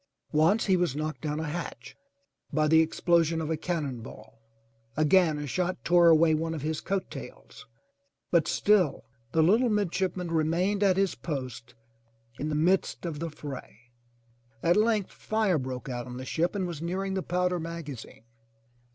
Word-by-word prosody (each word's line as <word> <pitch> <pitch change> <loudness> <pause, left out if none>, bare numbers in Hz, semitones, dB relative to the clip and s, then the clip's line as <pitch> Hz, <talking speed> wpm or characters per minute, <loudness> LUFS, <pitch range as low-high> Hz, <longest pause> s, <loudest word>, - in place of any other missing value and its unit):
Once 165 +9 +3
he 190 - +3
was 175 -6 0
knocked 155 +1 -4
down 150 -1 -2
a - - -2
hatch 170 +3 -6 0.6
by 155 0 +2
the 160 +1 +5
explosion 165 0 +2
of 160 0 -3
a - - +1
cannon 150 -7 -3
ball. 110 0 -13 0.6
Again 155 0 +4
a 150 - -4
shot 180 +6 -1
tore 175 -1 +5
away 160 0 +5
one 165 +1 -1
of 150 - -6
his 155 0 -2
coat 195 -1 -2
tails, 60 -1 -10 0.6
but 170 -3 +3
still 190 -9 +2 0.3
the 160 +2 +3
little 225 +9 +4
midship 190 -3 0
man 180 -2 -4
remained 170 +6 +1
at 195 -2 +3
his 195 -1 +2
post 125 -5 -6 0.6
in 150 - -2
the 150 - -1
midst 180 +4 +1
of 160 -4 -4
the 165 +1 -3
fray. 130 -6 -10 0.7
At 170 +1 +4
length 215 -2 +2
fire 215 -6 0
broke 130 0 -5
out 120 -2 -4
on 125 0 -7
the 130 - -6
ship, 170 +8 -1
and 190 -2 -1
was 170 -4 -5
nearing 190 +3 -2
the 190 - -1
powder 180 0 0
maga 165 -2 -6
zine. 110 -2 -12
165 Hz, 175 wpm, -28 LUFS, 150-185 Hz, 0.7 s, the